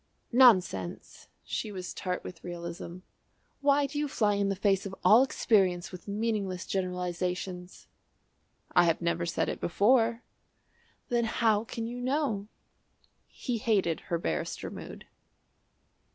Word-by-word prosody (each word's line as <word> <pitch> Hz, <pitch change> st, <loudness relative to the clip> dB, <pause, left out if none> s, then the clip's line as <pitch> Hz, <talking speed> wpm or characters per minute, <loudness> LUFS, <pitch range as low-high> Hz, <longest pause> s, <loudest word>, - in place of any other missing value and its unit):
"Nonsense." 185 Hz, -, +3 dB, 0.2 s
She 215 Hz, -, -3 dB
was 185 Hz, -2 st, -6 dB
tart 180 Hz, -2 st, -3 dB
with 170 Hz, -3 st, -9 dB
realism. 170 Hz, 0 st, -7 dB, 0.6 s
"Why 280 Hz, 0 st, +3 dB
do 290 Hz, +1 st, -4 dB
you 295 Hz, -, 0 dB
fly 210 Hz, -6 st, +1 dB
in 200 Hz, 0 st, +1 dB
the 195 Hz, -, 0 dB
face 195 Hz, 0 st, +1 dB
of 190 Hz, -, -8 dB
all 225 Hz, +4 st, +8 dB
experience 190 Hz, -9 st, +2 dB
with 180 Hz, +1 st, -10 dB
meaningless 200 Hz, -3 st, -2 dB
generalisations?" 180 Hz, -1 st, -3 dB, 0.9 s
"I 175 Hz, -1 st, +5 dB
have 165 Hz, -1 st, +2 dB
never 170 Hz, 0 st, -1 dB
said 165 Hz, -, 0 dB
it -, -, -4 dB
before." 230 Hz, +5 st, +3 dB, 0.9 s
"Then 240 Hz, -1 st, +2 dB
how 220 Hz, -1 st, +2 dB
can 225 Hz, 0 st, -5 dB
you 245 Hz, +2 st, -5 dB
know?" 255 Hz, -6 st, -1 dB, 0.8 s
He 245 Hz, -4 st, -4 dB
hated 195 Hz, -7 st, +1 dB
her 170 Hz, -, +1 dB
barrister 80 Hz, -, -3 dB
mood. -, -, -9 dB
195 Hz, 130 wpm, -29 LUFS, 180-230 Hz, 0.9 s, all